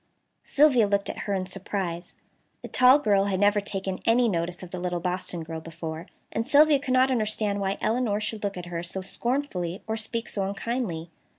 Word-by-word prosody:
Sylvia 270 -7 +4
looked 200 0 0
at - - -10
her 200 - +2
in 185 -1 -1
surprise. 185 -2 -4 0.5
The - - -5
tall 255 +2 +6
girl 205 -8 +2
had 195 -2 0
never 205 +1 +4
taken 195 -2 -4
any 235 +2 +4
notice 175 -2 -2
of 180 - -9
the 185 - -4
little 175 -1 -2
Boston 180 -1 -2
girl 160 0 -6
before, 165 +1 -7 0.2
and 225 - -1
Sylvia 290 +3 +5
could 260 -2 -1
not 260 +1 +4
understand 215 -3 0
why 195 0 -1
Elinor 220 -3 +1
should 215 0 -4
look 200 -2 -2
at 180 - -6
her 175 -1 -4
so 175 +2 -5
scornfully 195 -5 -2
or 220 - -2
speak 225 +1 -4
so 200 - -2
unkindly. 200 -6 -3
200 Hz, 195 wpm, -26 LUFS, 180-230 Hz, 0.5 s, tall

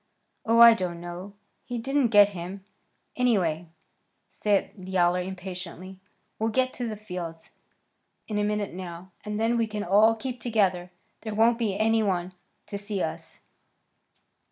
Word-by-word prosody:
"Oh, 230 +1 +4
I 235 0 +10
don't 180 -5 -3
know. 175 +3 -8 0.3
He 245 - -5
didn't 270 +2 +1
get 205 -2 +6
him, 190 +1 -7 0.5
anyway," 180 -10 +1 0.6
said 205 -2 0
Yowler 180 -2 +1
impatiently. 185 0 -7 0.4
"We'll 220 +1 +1
get 255 +3 +1
to 245 - -4
the 220 - -4
fields 180 -6 -7 0.8
in 210 -2 -2
a - - +1
minute 210 -2 -1
now, 180 0 -8
and 210 0 -4
then 230 +2 +2
we 230 -1 +1
can 210 -1 -4
all 210 +5 +5
keep 250 +2 -5
together. 195 -6 +1 0.3
There 220 -2 -5
won't 230 +2 +4
be 210 -4 0
any 225 +1 +3
one 185 -3 -1 0.3
to 200 - -6
see 205 -1 -3
us." 160 - -6
205 Hz, 150 wpm, -26 LUFS, 180-225 Hz, 0.8 s, I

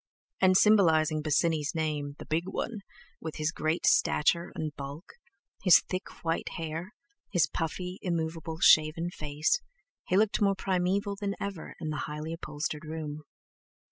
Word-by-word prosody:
And 185 0 +5
symbolizing 160 -8 +4
Bosinney's 155 0 +1
name 150 -3 -2
"the - - -9
big 165 +3 -1
one," 220 +2 -3 0.4
with 160 -1 -6
his 155 +1 0
great 160 +1 -1
stature 170 +3 +3
and 155 -2 -4
bulk, 140 +5 -8 0.5
his 180 - +7
thick 185 0 -6
white 165 0 -1
hair, 165 +5 -5 0.3
his 175 -6 +3
puffy 180 +4 -4
immovable 160 -2 -3
shaven 160 +3 +5
face, 150 - 0 0.5
he 185 - +2
looked 215 0 +2
more 200 -1 +3
primeval 190 +2 0
than 200 -1 -2
ever 195 -5 -5
in 160 -2 -4
the 155 - -3
highly 150 +2 -5
upholstered 150 -1 -4
room. 155 -1 -6
165 Hz, 140 wpm, -29 LUFS, 155-185 Hz, 0.5 s, his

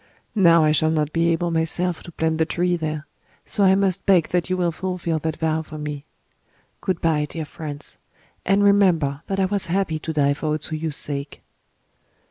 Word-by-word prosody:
Now 170 -6 +5
I 155 - +4
shall 155 +1 +3
not 155 -1 0
be 165 0 +2
able 170 +1 0
myself 165 +1 0
to 170 - -11
plant 160 0 -1
the 160 - +3
tree 180 +1 0
there: 155 -2 -4 0.4
so 205 - +1
I 190 0 +6
must 195 -1 0
beg 180 -5 +4
that 180 -1 -1
you 185 - 0
will 175 -2 +1
fulfill 175 -2 -3
that 160 0 -3
vow 160 0 0
for 155 -1 -9
me... 150 -1 -6 0.8
Good 185 -3 -2
bye, 155 -3 +1
dear 160 -2 -5
friends; 150 -1 -7 0.5
and 195 +2 +2
remember 175 -9 +3
that 195 0 -2
I 190 - +3
was 200 0 -1
happy 170 -3 0
to 160 - -4
die 140 -2 +2
for 150 +2 -5
O 155 0 +1
Tsuyu's 155 0 -2
sake." 140 0 -2
165 Hz, 195 wpm, -22 LUFS, 155-180 Hz, 0.8 s, I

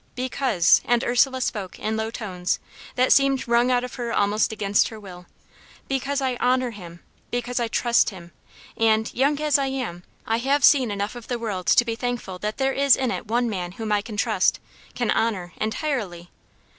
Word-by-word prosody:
"Because" 255 -8 +2
and 240 0 +1
Ursula 260 +2 +2
spoke 195 -6 -3
in 220 +1 -2
low 220 0 -2
tones, 185 -6 -3 0.4
that 255 +1 +4
seemed 275 -2 +2
wrung 235 +1 +3
out 250 -1 +2
of 250 - -6
her 235 -1 -3
almost 210 +2 +1
against 205 -2 +1
her 220 - -9
will 180 -3 -12 0.6
"because 270 +1 -1
I 260 -2 -1
honour 255 0 +1
him, 175 -5 -11 0.3
because 245 +1 -2
I 235 - 0
trust 235 +1 +2
him; 175 -4 -12 0.4
and, 220 0 +2
young 285 +3 +1
as 300 -2 +2
I 275 - 0
am, 250 -10 -4 0.2
I 225 - 0
have 275 +3 +2
seen 260 -5 +5
enough 205 0 -3
of 240 -2 -10
the 245 - -2
world 205 -6 -4
to 240 - +5
be 230 - -2
thankful 230 -6 -4
that 210 +2 -4
there 270 0 +1
is 275 -1 +5
in 260 -2 -1
it 225 - -5
one 240 +2 +1
man 180 -5 -4
whom 220 +1 -5
I 205 -1 +2
can 210 0 -8
trust, - - +1 0.4
can 240 -2 0
honour, 190 -6 -1
entirely. 215 - -3
235 Hz, 195 wpm, -24 LUFS, 205-255 Hz, 0.6 s, seen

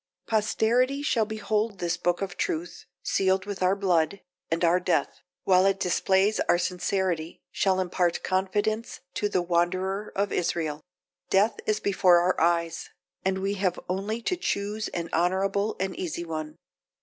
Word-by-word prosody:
Posterity 240 +5 +1
shall 230 -6 +2
behold 215 -1 -1
this 175 -1 -1
book 175 +1 0
of 190 -2 -5
truth, 170 0 -3 0.2
sealed 190 0 +1
with 205 -2 -6
our 185 +1 +3
blood; 185 -2 +1 0.3
and 165 +2 -1
our 170 +2 +4
death, 175 -5 0 0.2
while 185 -1 +5
it 195 0 +1
displays 190 +3 +2
our - - +5
sincerity, 180 -2 -2
shall 190 -1 +1
impart 180 -1 0
confidence 205 +4 -1
to 205 - -1
the 185 -3 +1
wanderer 185 +4 0
of 200 +1 0
Israel. 160 -3 -1 0.5
Death 205 +3 +3
is 215 0 +1
before 185 -3 +4
our 175 0 +1
eyes; 170 -1 0 0.3
and 190 0 +1
we 195 +1 -1
have 190 -3 -1
only 205 +5 -2
to 365 - 0
choose 210 - -2
an 170 -1 -4
honourable 195 +4 +1
and 190 0 -2
easy 170 -1 -4
one. 155 -2 -5
190 Hz, 150 wpm, -27 LUFS, 175-205 Hz, 0.5 s, while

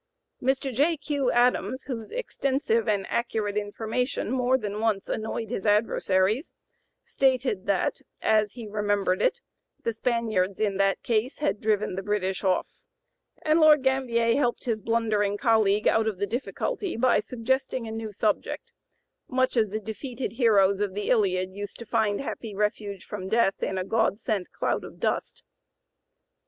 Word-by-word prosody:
'" - - -50
Mr. 270 0 -4
J. 305 +7 +2
Q. 285 -3 -1
Adams, 250 +2 +2
whose 230 -5 -6
extensive 270 - 0
and 200 -3 +1
accurate 220 -3 -1
information 220 +4 -2
more 255 0 +2
than 210 -3 -4
once 215 -3 0
annoyed 220 0 -3
his 195 - -3
adversaries, 210 - +2 0.5
stated 255 -7 +1
that, 200 -2 0 0.2
as 215 -1 +2
he 235 -2 -8
remembered 205 -3 0
it, - - +1 0.4
"the 230 - 0
Spaniards 220 -5 0
in 205 -3 0
that 195 0 +1
case 230 +3 0
had 295 -8 -1
driven 215 -2 +1
the 190 - -3
British 195 -2 -1
off," 185 -2 +1 0.7
and 310 +1 +3
Lord 305 -3 +6
Gambier 240 -4 +2
helped 245 -4 0
his 225 -3 -1
blundering 215 -2 +1
colleague 215 -2 +3
out 220 0 +3
of 215 -4 -1
the 200 - 0
difficulty 335 - -3
by 250 -1 +4
suggesting 250 +2 -2
a - - -5
new 220 -1 -5
subject, 210 +1 -1 0.6
much 255 0 +1
as 220 -3 +3
the 215 +2 -3
defeated 235 +2 -5
heroes 200 -5 +3
of 200 -2 -1
the 205 - -1
Iliad 185 -5 +2
used 205 0 -6
to 235 - -9
find 210 -1 +1
happy 225 -6 -6
refuge 205 -2 -2
from 190 -2 -6
death 220 -3 +2
in 190 - -1
a 185 - -2
god 220 -1 +1
sent 210 -5 -2
cloud - - -1
of - - -11
dust. - - -2
220 Hz, 160 wpm, -26 LUFS, 205-250 Hz, 0.7 s, Lord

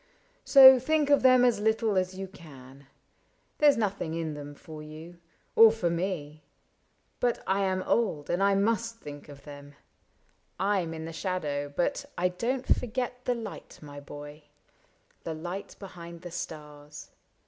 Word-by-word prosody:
So 265 -2 +9
think 295 +2 +1
of 285 - +5
them 255 -1 +6
as 235 -4 +2
little 220 0 +1
as 185 0 0
you 195 0 -5
can: 140 -6 -15 0.7
There 295 -1 +7
's - - -4
nothing 195 -7 -2
in 165 -2 -3
them 145 0 -9
for 155 0 -11
you, 160 +3 -11 0.4
or 225 -1 +8
for 190 -7 -1
me 165 -4 -4 0.4
— - - -44
But 245 -1 0
I 195 +1 +1
am 185 -1 -1
old 185 -11 0
and 175 +2 -1
I 200 0 +3
must 230 +3 0
think 145 -8 -10
of 140 -1 -13
them; 145 -1 -12 0.8
I 195 0 +1
*m 165 -1 -5
in 160 0 -6
the 165 - -7
shadow, 150 -6 -3
but 280 +9 -1
I 180 +1 +1
don't 245 +8 -3
forget 250 +1 -1
The 250 - +1
light, 225 -4 -8
my 145 -1 -10
boy, 145 +1 -11 0.4
— - - -38
the 160 - -4
light 175 +5 -7
behind 170 -3 -11
the 175 - -8
stars. 150 -2 -9
180 Hz, 170 wpm, -28 LUFS, 150-225 Hz, 0.8 s, So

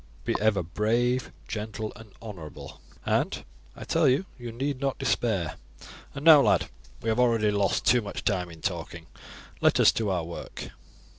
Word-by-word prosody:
Be - - +1
ever 105 -3 +2
brave, 120 +8 0 0.2
gentle, 110 0 -4
and 110 -2 -13
honourable, 85 -9 -9 0.2
and, - - 0 0.3
I - - -8
tell - - +2
you, 130 +9 +3
you 120 -2 -7
need 135 +3 -3
not 135 -1 -1
despair; 110 - 0 0.6
and 145 +2 -6
now, 155 -3 +10
lad, - - +2 0.3
we 115 - -1
have 110 +2 +1
already 115 -4 +3
lost 100 +1 +1
too 125 0 +5
much 100 -2 -6
time 90 -3 0
in 80 -1 -12
talking; 85 -3 -4 0.6
let - - +4
us - - +7
to 110 -3 -1
our 90 -3 0
work." 85 +1 -8
110 Hz, 165 wpm, -27 LUFS, 95-120 Hz, 0.6 s, now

